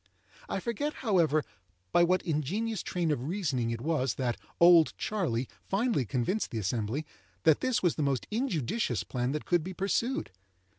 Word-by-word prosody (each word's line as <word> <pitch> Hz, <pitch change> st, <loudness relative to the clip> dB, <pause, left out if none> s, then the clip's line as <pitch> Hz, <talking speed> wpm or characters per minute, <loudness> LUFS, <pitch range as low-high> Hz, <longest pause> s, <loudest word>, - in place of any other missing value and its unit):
I -, -, -1 dB
forget, 240 Hz, +9 st, -2 dB
however, 165 Hz, -8 st, +3 dB, 0.5 s
by 175 Hz, -, +5 dB
what 185 Hz, +2 st, +2 dB
ingenious 190 Hz, +8 st, -1 dB
train 175 Hz, -3 st, -1 dB
of 145 Hz, -, -1 dB
reasoning 145 Hz, -, -1 dB
it 115 Hz, 0 st, -3 dB
was 135 Hz, -4 st, 0 dB
that 125 Hz, -3 st, -1 dB, 0.2 s
"Old 170 Hz, -2 st, +7 dB
Charley" 150 Hz, -, -1 dB, 0.2 s
finally 205 Hz, -, 0 dB
convinced 130 Hz, -, -1 dB
the 115 Hz, -, -5 dB
assembly 110 Hz, +7 st, -1 dB, 0.4 s
that 160 Hz, -2 st, +5 dB
this 255 Hz, -5 st, 0 dB
was 175 Hz, -, +3 dB
the -, -, 0 dB
most 140 Hz, -3 st, 0 dB
injudicious 200 Hz, -, -1 dB
plan 125 Hz, 0 st, -2 dB
that 150 Hz, -, -3 dB
could 175 Hz, -3 st, +2 dB
be 185 Hz, +2 st, -6 dB
pursued. 200 Hz, -, -1 dB
160 Hz, 160 wpm, -30 LUFS, 130-195 Hz, 0.5 s, Old